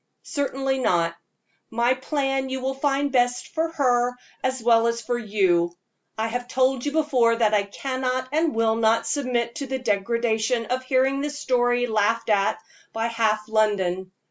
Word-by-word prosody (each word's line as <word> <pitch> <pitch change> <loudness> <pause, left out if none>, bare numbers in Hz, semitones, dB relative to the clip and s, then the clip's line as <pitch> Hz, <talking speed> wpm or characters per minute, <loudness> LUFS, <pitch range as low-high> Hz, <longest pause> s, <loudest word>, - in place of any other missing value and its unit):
"Certainly 270 -2 -2
not. 170 -8 +1 0.5
My 235 +2 +2
plan 270 0 -2
you 265 0 -3
will 265 +1 -2
find 280 +1 0
best 245 -1 +1
for 325 0 -1
her 245 -4 +2 0.3
as 260 0 0
well 230 -1 +4
as 235 0 -1
for 240 +1 -2
you. 190 -6 +1 0.4
I 220 - 0
have 245 +2 -4
told 255 0 +1
you - - 0
before 270 -7 +2
that 220 -2 +2
I 210 - +4
cannot 255 +4 -3
and 315 -1 +1
will 225 -1 +2
not 225 0 +2
submit 250 -5 -1
to 280 - -4
the 265 0 -2
degradation 230 +1 0
of 255 +2 -2
hearing 265 +1 +1
this 290 0 -4
story 245 -2 +1
laughed 225 0 +1
at 200 -1 +2 0.4
by 225 +1 -1
half 215 -2 0
London. 190 -4 0
245 Hz, 165 wpm, -24 LUFS, 220-265 Hz, 0.5 s, well